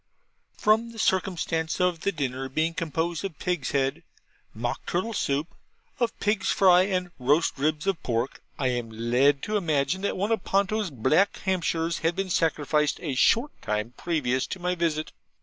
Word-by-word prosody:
From 220 +2 +3
the - - -12
circumstance 175 -5 0
of 180 -2 +2
the 200 - 0
dinner 135 -4 -3
being 160 +5 0
composed 165 0 -2
of 190 -7 -5
pig's 180 -7 -2
head 135 -1 0 0.5
mock 120 +2 -4
turtle 185 +6 -1
soup, 145 -5 -1 0.5
of 240 -2 -1
pig's 210 -1 +1
fry 185 -1 +5
and 180 -2 -1
roast 145 +6 +2
ribs 155 +3 0
of 195 -3 0
pork, 120 +1 -2 0.2
I 130 -2 +1
am 120 -2 -2
led 125 +5 +2
to 210 0 0
imagine 155 -1 0
that 200 - -1
one 200 +4 -1
of 220 -4 +1
Ponto's 200 +1 +1
black 150 - +2
Hampshires 170 -3 0
had 165 +1 0
been 195 -1 -2
sacrificed 150 -3 +1
a 150 -5 -2
short 235 - +3
time 105 +3 -2
previous 130 -7 -1
to 185 - -5
my 180 0 0
visit. 165 -3 -1
165 Hz, 165 wpm, -26 LUFS, 140-190 Hz, 0.5 s, fry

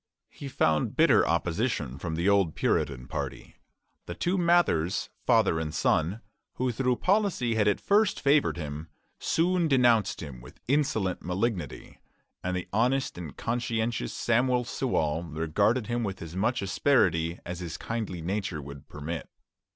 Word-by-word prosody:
He 140 - -8
found 80 - +1
bitter - - +5
opposition 85 - -1
from 80 +1 -3
the 85 +3 0
old 100 -5 +3
Puritan 65 -3 0
party. - - -6 0.5
The 85 - -5
two 175 - 0
Mathers, 170 - +2 0.2
father 80 - +4
and 80 -1 -3
son, 90 +8 +1 0.3
who 130 0 0
through 125 +2 +1
policy 185 - +1
had 105 -2 +2
at 105 - +2
first 205 0 +2
favored 140 -7 +3
him, 75 0 -6 0.3
soon 175 0 +1
denounced 120 -7 +3
him 65 -5 -9
with 65 - -14
insolent 115 -9 +1
malignity, 90 - -3 0.4
and 90 0 -1
the 90 - -5
honest 125 +5 +1
and 80 -6 -8
conscientious 115 - -1
Samuel 125 +1 +1
Sewall 85 - -1
regarded 85 - 0
him 120 +1 -1
with 95 -3 -4
as 85 +1 -9
much 110 +3 0
asperity 90 - +2
as 90 0 -5
his 85 -3 -5
kindly 110 -7 -4
nature 95 -2 -2
would 70 -1 -10
permit. 75 +3 -6
100 Hz, 145 wpm, -28 LUFS, 80-125 Hz, 0.5 s, bitter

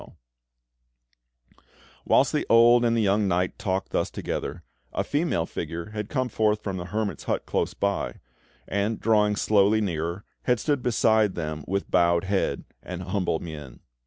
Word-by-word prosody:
Whilst - - +4
the - - 0
old 120 +1 +6
and 115 -1 +2
the 115 - +2
young 100 +1 +2
knight 90 0 0
talked 95 -2 -2
thus - - 0
together, - - -4 0.3
a - - -1
female 145 - 0
figure 85 +4 -5
had 105 -1 -5
come 130 -3 0
forth 105 -2 +1
from 95 -2 -3
the 90 - -5
hermit's 105 +3 -3
hut - - -1
close - - -1
by, 100 0 -1 0.5
and, 100 +3 -1
drawing 105 -2 +3
slowly 105 +1 +3
nearer, 85 -1 -2 0.2
had 125 -2 +2
stood 145 0 0
beside 110 -4 +2
them 80 -2 -4
with 100 +2 -2
bowed 85 -1 +3
head 95 -7 -1 0.2
and 90 0 -6
humble 90 -2 -1
mien. 75 -7 -9
100 Hz, 155 wpm, -26 LUFS, 90-110 Hz, 0.5 s, old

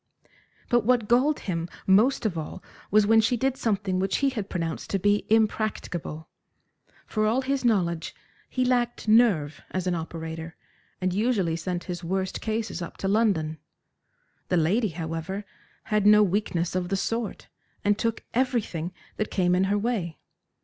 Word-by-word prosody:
But 240 -2 +3
what 235 -1 +2
galled 260 +6 +3
him 170 -3 -3 0.2
most 220 +7 +4
of 200 -5 0
all 160 -2 -6 0.3
was, 210 +1 +5
when 225 +1 +5
she 240 +2 +1
did 265 +2 +1
something 200 -7 0
which 195 0 +1
he 275 -1 +2
had 215 -6 -4
pronounced 165 -3 -3
to 195 - +1
be 205 +2 +1
impracticable. 210 -7 0 0.8
For 215 -1 0
all 235 +5 +2
his 275 0 -1
knowledge 175 -8 +1 0.3
he 255 -1 0
lacked 240 -2 0
nerve 200 -11 +4
as 185 -1 -3
an 180 - +1
operator, 160 -1 -5 0.4
and 185 -1 0
usually 200 -5 +1
sent 175 +2 -3
his 175 -1 -5
worst 190 +2 -2
cases 220 -4 -2
up 170 - -7
to 195 - -2
London. 195 -8 +1 0.9
The 180 - +2
lady, 200 +8 +2
however, 165 +4 -4 0.4
had 210 -1 +1
no 210 0 +8
weakness 180 -3 0
of 180 -1 -1
the 195 - 0
sort, 225 +2 -3 0.4
and 205 0 +4
took 230 +1 -2
everything 225 -9 -1 0.2
that 215 - -1
came 180 -2 +2
in 185 +1 +3
her 200 +2 +1
way. 205 -7 -2
200 Hz, 160 wpm, -26 LUFS, 175-225 Hz, 0.9 s, no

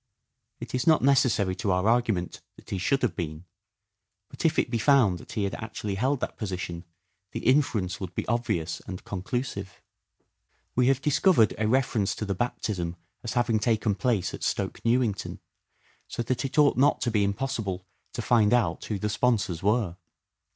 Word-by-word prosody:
It - - -8
is 130 +3 -1
not 160 -4 +5
necessary 125 -8 +3
to 100 - -2
our 90 +3 +1
argument 115 -6 +1
that - - -15
he 95 - -1
should 135 +9 +1
have 105 -9 +1
been, 80 0 -5 0.8
but - - -8
if 160 -1 +3
it - - +1
be 115 - 0
found 110 -8 +4
that - - -11
he 105 - 0
actually 105 0 -4
held 130 +7 0
that - - -4
position 90 -4 -4 0.5
the - - -3
inference 115 -9 +2
would 90 -3 -6
be - - -2
obvious 90 -8 -1
and 90 -1 -6
conclusive. 100 0 -4 1.0
We 125 0 +3
have 135 0 +2
dis 150 - +2
covered 150 - +5
a 110 - +1
reference 115 -4 +1
to 105 - -4
the 100 - -1
baptism 90 -5 -2 0.3
as 115 -2 -3
having 120 -2 +2
taken 110 -2 +1
place 105 -4 0
at - - -7
Stoke - - -2
Newington, 115 -4 0 0.7
so 120 - -3
that 125 +2 -1
it 135 +4 -5
ought 145 -4 +5
not 140 +3 +4
to 120 +2 0
be 105 -2 +2
impossible 100 -3 -2 0.3
to 120 - -4
find 115 -1 +4
out 95 -9 0
who 105 - -2
the 105 - -2
sponsors 105 -5 0
were. 105 -4 +1
110 Hz, 180 wpm, -27 LUFS, 95-125 Hz, 1.0 s, not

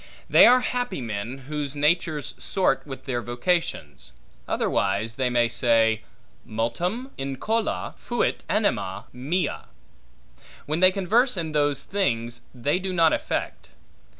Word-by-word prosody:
They - - +8
are 250 +1 +6
happy 245 - -2
men, 115 +3 -5
whose 150 -2 -4
natures 150 0 +1
sort 180 -7 0
with 135 -2 -8
their 125 -3 -2
vocations; 120 - -2 0.3
otherwise 100 +3 0
they 130 +1 0
may 120 -1 +3
say, 115 -2 +2 0.4
multum 175 - -2
incola 135 - -2
fuit - - -1
anima - - 0
mea; 150 +9 -2 1.0
when 155 +3 -1
they 185 +1 +7
converse 210 +5 +2
in 160 -2 -2
those 145 -2 +1
things, 120 -12 -1
they 140 +7 0
do 190 0 -3
not 165 -3 +4
affect. - - -3
145 Hz, 125 wpm, -25 LUFS, 120-180 Hz, 1.0 s, They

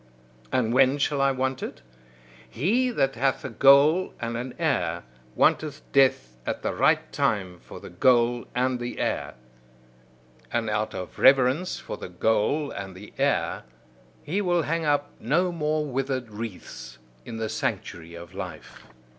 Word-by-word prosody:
And 115 -2 +1
when 135 +2 +4
shall 145 -1 0
I 140 0 +4
want 130 0 -2
it? 60 - -7 0.7
He 220 - +1
that 135 - +1
hath 135 +3 0
a 130 - -4
goal 140 - +5
and 115 0 -3
an 125 +2 -5
heir, 130 - 0 0.3
wanteth 150 -1 +1
death 130 - +3
at - - -4
the - - -1
right - - +2
time 95 -5 -1
for - - -11
the - - -11
goal 120 +4 +3
and 125 0 +1
the 120 0 -5
heir. - - -2 1.2
And 115 -2 -1
out 110 0 -1
of 90 -1 -7
reverence 135 +6 +4
for - - -7
the - - -8
goal 110 - +1
and 95 -2 -7
the 100 +3 -12
heir, - - +1 0.6
he 180 +8 -1
will 175 -3 +1
hang 165 +2 -1
up 145 -1 +1
no 170 +10 +1
more 155 -2 -1
withered 130 -3 -3
wreaths 105 -2 -8 0.3
in 115 - -7
the 110 0 -2
sanctuary 85 -5 -4
of 85 +1 -11
life. 90 -4 -8
130 Hz, 155 wpm, -26 LUFS, 110-145 Hz, 1.2 s, goal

